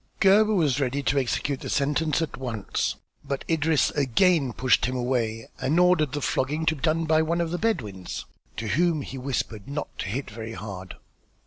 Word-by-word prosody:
Gebhr 210 +2 +5
was 145 -7 +2
ready 140 +1 -1
to 140 +1 +2
execute 135 +1 -1
the - - -6
sentence 150 +3 +1
at 160 - -5
once 120 -6 -2 0.3
but 140 -1 -4
Idris 160 -2 +2
again 145 - +3
pushed 125 +3 +2
him 130 - -2
away 120 -3 -1
and 155 +6 +1
ordered 175 -6 +4
the 145 - -2
flogging 150 +5 0
to 160 - +2
be 140 - -12
done 165 +2 +1
by 160 0 +4
one 165 +2 0
of 170 -1 -1
the 175 - -2
Bedouins, 105 - -2 0.3
to 110 - -3
whom 165 +1 +2
he 135 - -7
whispered 125 -5 -3
not 145 +2 -5
to - - -2
hit 125 +7 -4
very 110 +1 -6
hard. 95 -4 -7
140 Hz, 190 wpm, -26 LUFS, 125-160 Hz, 0.3 s, Gebhr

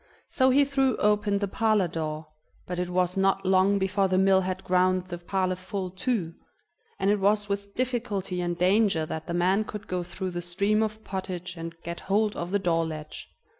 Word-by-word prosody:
So 260 -1 +3
he 280 +2 +5
threw 270 -3 +1
open 210 -1 +2
the 200 0 -1
parlor 215 -2 +2
door, 155 -1 -4 0.4
but 180 0 -4
it 180 0 -2
was 180 0 +1
not 195 0 +1
long 190 +2 +4
before 195 0 +1
the 185 0 +1
mill 190 0 +5
had 185 +1 -3
ground 185 0 +2
the 175 -1 -7
parlor 185 +1 -1
full 185 0 -5
too, 190 -4 -2 0.6
and 195 - +2
it 210 - +2
was 205 +1 +2
with 200 0 -4
difficulty 220 -8 -2
and 175 -1 -2
danger 185 -2 +3
that 160 0 -6
the 170 - -2
man 185 +4 +2
could 210 -1 -7
go 180 -1 -2
through 185 +1 -5
the 175 0 -4
stream 200 +5 +1
of 220 0 -2
pottage 180 -2 -5
and 165 0 -7
get 170 0 -5
hold 210 +2 +1
of 170 - -4
the 200 - +2
door 170 -4 +1
latch. 155 -1 -7
190 Hz, 200 wpm, -27 LUFS, 180-205 Hz, 0.6 s, he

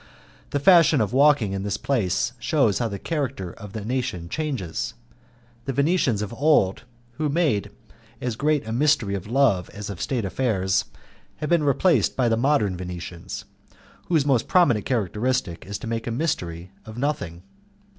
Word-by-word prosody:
The 145 - -1
fashion 165 -2 +6
of 110 +1 0
walking 135 -7 +4
in 95 - -2
this 100 +1 -2
place 120 -2 0
shews 125 -4 +2
how 120 - 0
the 100 -2 -5
character 130 - -3
of 100 0 -11
a 105 -2 -5
nation 110 -9 -2
changes. 130 - -3 0.7
The 135 - -2
Venetians 140 - +2
of 105 - -6
old 135 -9 +3
time - - -17 0.3
who 155 -1 +1
made 140 - +1 0.5
as 125 -3 -3
great 145 -1 0
a - - -3
mystery 125 -5 +2
of 100 0 -4
love 115 -7 +2
as 105 0 -7
of 95 - -8
state 120 -6 -1
affairs, 95 -3 0 0.5
have 150 - -4
been 170 -2 +4
replaced 145 - +2
by 125 -3 +3
the 115 - +3
modern 115 -6 +2
Venetians, 90 -1 -7 0.6
whose 160 -5 +2
most 135 -5 +2
prominent 125 - +3
characteristic 110 -5 -1
is 100 0 -4
to - - -9
make 115 0 -3
a - - -1
mystery 90 - -3
of 110 0 -10
nothing. 120 - -3
115 Hz, 165 wpm, -24 LUFS, 100-140 Hz, 0.7 s, fashion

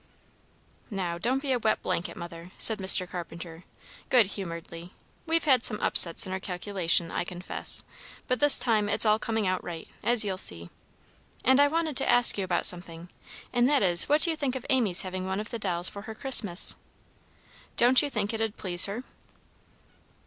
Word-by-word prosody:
"Now, 180 -5 -5
don't 260 - -2
be 275 - -1
a 250 - 0
wet 220 -1 -1
blanket, 170 - -4
Mother," 170 0 -10
said 220 -2 -2
Mr. 190 -1 +3
Carpenter, 170 -1 -9 0.4
good 245 -4 +4
humoredly. 170 -2 -9 0.3
"We've 330 +1 +1
had 260 -5 +2
some 210 -2 +1
upsets 170 -2 +5
in 185 - -7
our 190 - -4
calculation, 180 -3 -1
I - - -3
confess, 180 +1 +2 0.4
but 255 - -1
this 290 -1 +5
time 220 -4 0
it's - - 0
all 215 0 +2
coming 220 -1 -3
out 185 0 -2
right, 165 -2 -8
as 235 0 +2
you'll 190 -2 -3
see. 85 - -3 0.7
And 260 +2 +4
I 285 - +5
wanted 320 -1 -3
to - - +1
ask 245 0 +4
you 200 - -3
about 180 -2 -1
something, 175 -1 -2 0.4
and 245 +1 +2
that 290 -6 +2
is 175 -2 +5
what 300 +3 +4
you'd 325 -2 -2
think 265 -3 -2
of 260 - -7
Amy's 220 -9 +1
having 185 0 -6
one 190 +1 -3
of 215 - -7
the 235 - -5
dolls 180 -3 -1
for 200 - -6
her 220 +1 -10
Christmas? 210 -9 +2 1.0
Don't 250 +2 +5
you 290 - -3
think 215 -4 -3
it'd 225 -1 -3
please 175 -2 +1
her?" 215 +6 -6
205 Hz, 185 wpm, -26 LUFS, 175-245 Hz, 1.0 s, upsets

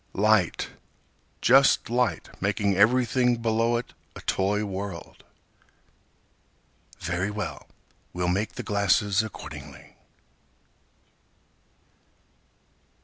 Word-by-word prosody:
Light, 105 -3 +2 0.7
just 135 +2 +5
light 120 +1 0
making 100 0 +1
everything 125 +3 +3
below 115 +1 +1
it 120 - -6 0.2
a - - -9
toy 105 +2 0
world. 95 -3 -7 1.7
Very 90 +3 -2
well, 105 -3 -5 0.4
we'll 90 0 -2
make 100 +5 -1
the - - -6
glasses 100 0 +2
accordingly. 110 -1 -10
105 Hz, 80 wpm, -26 LUFS, 95-115 Hz, 1.7 s, just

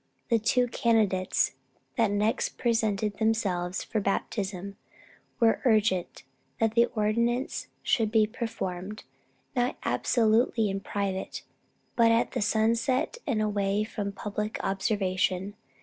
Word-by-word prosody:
The 230 -2 +4
two 250 +3 +2
candidates 220 -6 +1 0.4
that 230 -4 +3
next 210 +2 0
presented 215 -3 0
themselves 190 -5 0
for 220 - -2
baptism, 195 -1 -2 0.6
were 230 -2 +3
urgent 215 -7 +1 0.4
that 225 -1 +2
the 235 +1 +4
ordinance 235 +4 0 0.2
should 225 -4 +2
be 220 -2 +5
performed, 210 -4 -5 0.5
not 245 0 0
absolutely 225 -2 +2
in 195 - -2
private, 195 -1 -3 0.5
but 230 -1 +5
at 230 +1 +2
sunset 230 - +1
and 220 -6 +1
away 205 0 0
from 205 -2 -4
public 210 +2 -4
observation. 195 -1 0
215 Hz, 110 wpm, -28 LUFS, 195-230 Hz, 0.6 s, be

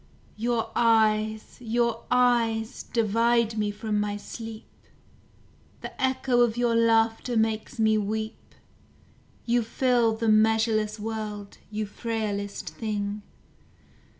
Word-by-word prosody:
Your 230 0 -1
eyes, 220 -1 +2
your 235 0 -1
eyes, 240 -2 +2
divide 230 0 +1
me 210 -1 0
from 210 0 -2
my 205 0 -1
sleep; 225 +1 -8 1.2
The - - -7
echo 260 -1 +2
of 240 -1 +2
your 240 -1 +2
laughter 230 +1 +2
makes 220 -1 -1
me 220 -1 +3
weep, 215 +2 -5 0.9
You 240 0 +2
fill 235 -1 +1
the 225 0 -2
measureless 215 0 +2
world, 210 -2 -5
you 215 0 -3
frailest 205 -2 -4
thing! 210 -2 -4
225 Hz, 105 wpm, -26 LUFS, 215-235 Hz, 1.2 s, me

